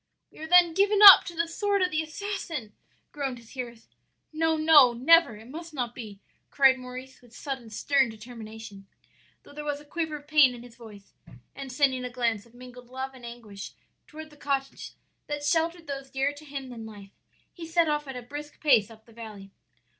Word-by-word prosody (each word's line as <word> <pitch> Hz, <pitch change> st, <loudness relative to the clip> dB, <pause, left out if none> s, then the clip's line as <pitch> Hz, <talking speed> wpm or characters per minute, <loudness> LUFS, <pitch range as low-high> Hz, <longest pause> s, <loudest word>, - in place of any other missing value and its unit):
"'We -, -, -17 dB
are 315 Hz, -, -7 dB
then 350 Hz, 0 st, +5 dB
given 400 Hz, +3 st, +2 dB
up 395 Hz, -2 st, +11 dB
to 345 Hz, -, -8 dB
the 335 Hz, +1 st, -1 dB
sword 400 Hz, +3 st, 0 dB
of 365 Hz, -, 0 dB
the 315 Hz, -2 st, 0 dB
assassin!' 320 Hz, -, -6 dB, 0.4 s
groaned 275 Hz, -4 st, -4 dB
his 230 Hz, -1 st, -17 dB
hearers. 235 Hz, -3 st, -8 dB, 0.5 s
"'No, 320 Hz, 0 st, +1 dB
no, 305 Hz, -6 st, +6 dB
never! 275 Hz, +1 st, +4 dB
it 220 Hz, +2 st, -14 dB
must 325 Hz, +3 st, -9 dB
not 240 Hz, -3 st, -3 dB
be!' 215 Hz, -5 st, -10 dB, 0.3 s
cried 265 Hz, -2 st, +4 dB
Maurice 255 Hz, +1 st, -10 dB
with 240 Hz, -2 st, -19 dB
sudden 265 Hz, -5 st, -6 dB
stern 270 Hz, +4 st, +1 dB
determination, 220 Hz, -2 st, -11 dB, 0.6 s
though -, -, -16 dB
there 300 Hz, +1 st, -7 dB
was 290 Hz, -1 st, -3 dB
a 295 Hz, -, -16 dB
quiver 320 Hz, 0 st, -4 dB
of 290 Hz, -1 st, -11 dB
pain 295 Hz, -5 st, +5 dB
in 240 Hz, -, -11 dB
his 245 Hz, -2 st, -15 dB
voice; 210 Hz, -4 st, -14 dB, 0.4 s
and 275 Hz, -1 st, -8 dB
sending 260 Hz, -1 st, +1 dB
a 250 Hz, -, -4 dB
glance 235 Hz, -3 st, -2 dB
of 235 Hz, -, -24 dB
mingled 250 Hz, 0 st, -13 dB
love 260 Hz, +1 st, -6 dB
and 245 Hz, -2 st, -11 dB
anguish 220 Hz, -4 st, -10 dB, 0.3 s
toward 310 Hz, 0 st, -11 dB
the 295 Hz, -, -18 dB
cottage 275 Hz, -1 st, -4 dB, 0.3 s
that 295 Hz, 0 st, -4 dB
sheltered 330 Hz, +2 st, 0 dB
those 275 Hz, -2 st, -7 dB
dearer 270 Hz, +2 st, -1 dB
to 295 Hz, +1 st, -14 dB
him 275 Hz, -2 st, -7 dB
than 235 Hz, -2 st, -9 dB
life, 205 Hz, -3 st, -12 dB, 0.4 s
he 335 Hz, -2 st, -9 dB
set 335 Hz, 0 st, +2 dB
off 295 Hz, -1 st, -1 dB
at 265 Hz, -1 st, -7 dB
a 250 Hz, -, -8 dB
brisk 290 Hz, +4 st, -9 dB
pace 240 Hz, -9 st, +3 dB
up 220 Hz, -1 st, -16 dB
the 230 Hz, -, -19 dB
valley. 210 Hz, -4 st, -11 dB
270 Hz, 200 wpm, -27 LUFS, 235-310 Hz, 0.6 s, up